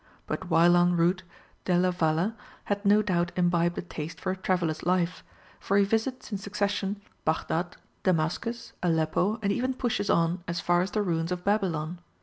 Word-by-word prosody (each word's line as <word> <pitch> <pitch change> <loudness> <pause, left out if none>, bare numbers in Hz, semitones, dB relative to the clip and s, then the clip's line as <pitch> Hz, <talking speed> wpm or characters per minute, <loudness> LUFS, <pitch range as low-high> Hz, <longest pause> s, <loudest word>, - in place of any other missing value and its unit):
But 185 - -4
while 170 +1 +5
en 175 0 +3
route, 175 +2 +2 0.4
Delia 180 0 +2
Valle 170 +4 +1 0.3
had 205 0 -2
no 210 +1 +5
doubt 175 -3 0
imbibed 175 -1 +2
a - - -2
taste 165 -2 -7
for 185 - -1
a - - -2
traveller's 180 -4 -1
life, 180 0 0 0.4
for 200 - +1
he 200 - +6
visits 225 +5 -1
in 200 - -2
succession 200 0 -2 0.2
Baghdad, 165 +2 -1 0.2
Damascus, 185 +7 -1
Aleppo, 170 +5 +1
and 200 - +2
even 255 +5 0
pushes 240 -5 -1
on 170 +1 +2
as 170 0 -2
far 175 0 +2
as 185 - -1
the 210 0 0
ruins 165 -2 -1
of 180 0 -3
Babylon. 180 -5 0
180 Hz, 170 wpm, -28 LUFS, 170-200 Hz, 0.4 s, he